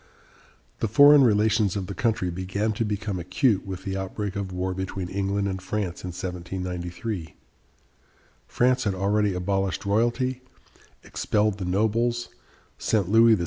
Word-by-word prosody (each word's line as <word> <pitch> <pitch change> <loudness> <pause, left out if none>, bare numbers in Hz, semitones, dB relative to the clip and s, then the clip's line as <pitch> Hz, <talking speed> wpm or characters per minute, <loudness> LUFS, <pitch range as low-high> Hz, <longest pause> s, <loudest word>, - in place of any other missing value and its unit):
The - - 0
foreign 145 +6 +7
relations 105 -3 +3
of 100 -2 -2
the 100 - -6
country 105 -5 0
began 95 +5 -2
to 110 - -1
become 105 -2 -3
acute 95 +4 +1
with 95 -2 -6
the 95 0 -3
outbreak 95 +1 -4
of 100 -2 -3
war 90 +1 -2
between 95 -1 -4
England 100 +1 -1
and 95 -1 -3
France 95 -2 -3
in - - -4
1793. 90 +1 -5 1.1
France 125 0 +2
had 100 -2 0
already 100 +1 +1
abolished 95 -1 -1
royalty, 120 +5 +1 0.6
expelled 105 -1 0
the 95 - -3
nobles, 115 +5 0 0.5
sent 100 -5 +1
Louis 115 0 +7
XVI. - - -5
100 Hz, 145 wpm, -25 LUFS, 95-110 Hz, 1.1 s, foreign